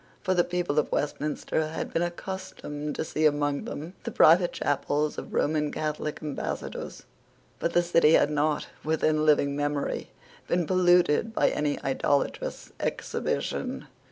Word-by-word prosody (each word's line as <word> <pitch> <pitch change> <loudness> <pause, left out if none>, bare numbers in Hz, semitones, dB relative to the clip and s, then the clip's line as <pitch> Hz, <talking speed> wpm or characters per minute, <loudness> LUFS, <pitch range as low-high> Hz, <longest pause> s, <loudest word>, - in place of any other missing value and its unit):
For 185 -2 +2
the 175 -1 +4
people 175 -4 0
of - - -1
Westminster 150 +2 -1
had 160 - -5
been 165 - +1
accustomed 175 -4 -5
to - - -2
see 155 0 +2
among 145 -1 0
them 160 +5 -6
the - - -3
private 175 +2 +5
chapels 145 +1 -1
of - - -9
Roman 150 -1 +1
Catholic 155 0 -3
Ambassadors: 150 -2 -5 0.6
but 170 - -1
the 175 - +4
City 170 -2 +4
had - - +4
not, 150 0 +1 0.2
within 155 0 +1
living 140 -2 +3
memory, 145 0 -2 0.4
been 175 -1 +1
polluted 180 +3 +3
by - - +4
any 150 -1 -1
idolatrous 135 +1 -1
exhibition. - - -2
155 Hz, 140 wpm, -27 LUFS, 145-175 Hz, 0.6 s, private